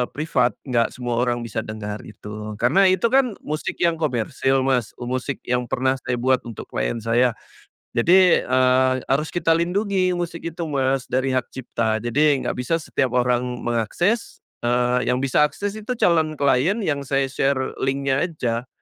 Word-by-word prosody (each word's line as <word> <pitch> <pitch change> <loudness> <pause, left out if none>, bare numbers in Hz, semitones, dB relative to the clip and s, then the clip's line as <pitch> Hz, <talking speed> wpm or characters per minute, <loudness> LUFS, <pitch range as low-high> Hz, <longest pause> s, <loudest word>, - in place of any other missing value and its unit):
privat, 140 -5 +1
nggak 120 -4 0
semua 120 -2 -2
orang 120 0 0
bisa 115 -1 -4
dengar 105 -1 -5
itu. 105 0 -8
Karena 145 +12 +4
itu 185 +4 +3
kan 255 -5 +3
musik 155 +1 -3
yang 170 -2 +2
komersil 135 -1 0
Mas, 130 -4 0
musik 130 +2 -3
yang 125 0 -1
pernah 130 +3 0
saya 125 0 -2
buat 130 0 +3
untuk 115 - -8
klien - - -2
saya. 120 +2 +2 0.6
Jadi, 180 +7 +5
e 130 +1 +2 0.5
harus 145 +3 +1
kita 165 -2 +2
lindungi 185 +2 +1
musik 175 -1 -4
itu 170 0 -4
Mas, 135 -3 0
dari 130 +1 0
hak 130 -1 -1
cipta. 115 -3 -1
Jadi 140 +3 +2
nggak - - -1
bisa 125 +7 0
setiap 140 -4 -1
orang 125 0 +2 0.2
mengakses, 145 - -1 0.2
eee, 125 +1 +1
yang 125 - +2
bisa 135 +2 +2
akses 200 +8 -4
itu 215 +4 -3
calon 160 -6 +2
klien 140 - +2
yang 145 -4 0
saya 135 0 +1
share 135 0 -1
link-nya 135 +2 +1
aja. 125 -6 -3
130 Hz, 165 wpm, -22 LUFS, 120-160 Hz, 0.6 s, Jadi